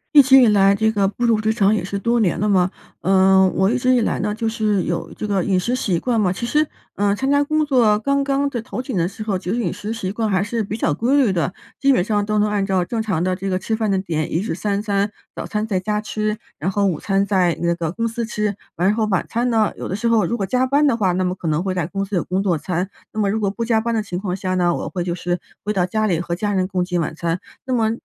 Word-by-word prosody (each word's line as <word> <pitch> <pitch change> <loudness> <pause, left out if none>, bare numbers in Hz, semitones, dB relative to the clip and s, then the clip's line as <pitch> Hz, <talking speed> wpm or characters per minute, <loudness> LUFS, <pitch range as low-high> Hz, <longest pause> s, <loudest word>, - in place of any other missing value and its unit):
一 285 - +11
直 265 0 +7
以 245 - +6
来 200 -2 +5
这 220 +2 +2
个 200 -2 +2
步 240 +4 -2
入 225 -2 +3
职 215 0 +1
场 210 -1 +3
也 210 - -2
是 200 +2 -3
多 235 +3 +1
年 190 -5 +1
了 210 - +1
嘛， 185 -3 +3 0.3
嗯， 190 +1 +4
我 190 +1 +2
一 255 - +1
直 255 +1 +2
以 250 - +4
来 230 - 0
呢， 210 +1 -1
就 225 +1 -2
是 215 -4 0
有 170 0 -3
这 215 - -5
个 195 -3 +1
饮 190 -2 +1
食 235 +7 -1
习 190 -9 0
惯 235 0 0
嘛。 185 -3 +2
其 185 +6 -4
实， 300 +6 +2 0.3
呃， 200 0 +2
参 265 +6 -1
加 285 0 +4
工 305 +1 +1
作 235 -7 +3
刚 280 +5 +1
刚 280 0 0
的 245 -4 -4
头 230 - -5
几 260 0 -6
年 190 - 0
的 170 - 0
时 215 +2 -8
候， 205 -3 -1
其 180 -1 -7
实 230 - 0
饮 235 - -1
食 205 +2 -6
习 195 -4 -3
惯 220 0 -1
还 190 -2 +2
是 220 +3 -2
比 210 +2 -4
较 165 - +1
规 240 - +1
律 250 -9 +3
的。 180 +1 -1 0.3
基 275 - +4
本 255 - +3
上 205 +2 0
都 215 0 0
能 210 0 +2
按 205 -1 0
照 190 -2 +1
正 225 +4 -2
常 200 -7 -1
的 185 0 0
这 195 +2 -4
个 185 -1 0
吃 220 +4 -2
饭 220 -2 -1
的 190 - +2
点， 160 -5 -2
一 - - +1
日 195 -3 -2
三 200 +2 -1
餐， 205 -1 0 0.2
早 - - -5
餐 215 0 -2
在 190 -4 -1
家 210 +2 -1
吃， 215 0 -2 0.2
然 180 +6 -1
后 200 +1 +1
午 180 -5 +1
餐 195 0 +1
在 185 -4 +2
那 170 0 +1
个 165 -2 -3
公 230 +5 -2
司 230 +1 -3
吃。 210 -2 -2 0.2
完 180 - +2
了 205 - +3
后 220 -1 +1
晚 190 -4 0
餐 240 +2 0
呢， 220 -3 +2
有 - - -6
的 190 - -2
时 235 +2 -1
候 230 -2 +3
如 235 - -1
果 200 - -1
加 250 +6 +1
班 285 +3 +3
的 270 - +3
话， 200 -5 +1
那 185 +1 0
么 180 0 -1
可 170 -3 -4
能 155 +1 +1
会 190 0 -2
在 180 -4 -1
公 195 +2 -3
司 200 +1 -4
有 175 - +1
工 185 +2 -1
作 185 -4 +1
餐。 180 +4 -2 0.2
那 220 - -5
么 205 -2 +2
如 220 +2 -1
果 200 -2 +1
不 230 +3 -3
加 225 -1 +2
班 235 +1 -1
的 225 - +1
情 190 -4 -5
况 185 -1 -3
下 185 0 -2
呢， 175 -1 +2
我 - - -4
会 180 -3 -3
就 175 -1 -2
是 175 0 -2 0.2
回 210 - 0
到 185 -3 +1
家 215 +4 0
里 170 -4 0
和 170 0 -3
家 205 +3 -1
人 185 -1 0
共 180 -2 0
进 180 -1 -1
晚 155 - -3
餐。 165 +2 -2 0.2
那 260 - -2
么 225 -3 +2
205 Hz, 330 characters per minute, -20 LUFS, 185-225 Hz, 0.3 s, 一